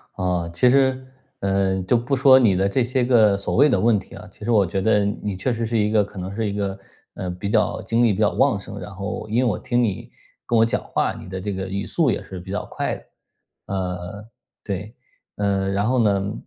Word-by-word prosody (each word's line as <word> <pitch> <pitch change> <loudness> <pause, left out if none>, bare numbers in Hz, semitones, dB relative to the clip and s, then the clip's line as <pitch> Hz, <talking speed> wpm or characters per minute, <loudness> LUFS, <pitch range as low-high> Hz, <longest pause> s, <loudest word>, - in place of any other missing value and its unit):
啊， 90 -2 -1
其 125 +8 +4
实， 130 -1 +2 0.3
呃， 95 -1 0
就 120 +6 +2
不 125 +4 -1
说 130 0 +7
你 105 -7 +4
的 95 +1 +2
这 125 +4 +1
些 125 +1 0
个 110 -5 +4
所 100 - -3
谓 145 +3 +7
的 - - +2
问 115 -2 +3
题 - - -13
啊， 105 +2 -10
其 105 - -14
实 120 - 0
我 105 -4 +4
觉 95 +1 -2
得 105 -1 +3
你 100 -1 -3
确 95 +7 -1
实 115 0 -2
是 115 0 -1
一 105 0 +1
个 105 -2 +4
可 100 -1 -12
能 95 +2 -5
是 110 -2 -1
一 - - -4
个， 100 -1 -3 0.4
呃， 90 - -4
比 95 +3 -5
较 110 -1 +1
精 115 +1 +1
力 110 -4 +4
比 100 - -5
较 105 - +3
旺 135 -6 +2
盛， 100 +1 -9
然 95 - -7
后 100 +2 -5
因 110 - 0
为 130 - +3
我 110 -7 0
听 120 0 0
你 100 -5 -3 0.4
跟 120 - +1
我 110 - +5
讲 115 - -1
话， - - -1
你 - - -10
的 95 0 -5
这 105 +1 -3
个 95 0 -4
语 100 +2 -3
速 160 -6 +1
也 - - -1
是 95 -2 -8
比 95 +2 -9
较 105 - -3
快 - - -3
的。 - - -13 0.6
呃， 95 +1 -4 0.4
对。 100 +3 -5 0.4
呃， 100 -1 0
然 100 +2 0
后 125 +1 +2
呢 100 -1 +1
105 Hz, 260 characters per minute, -22 LUFS, 95-115 Hz, 0.6 s, 说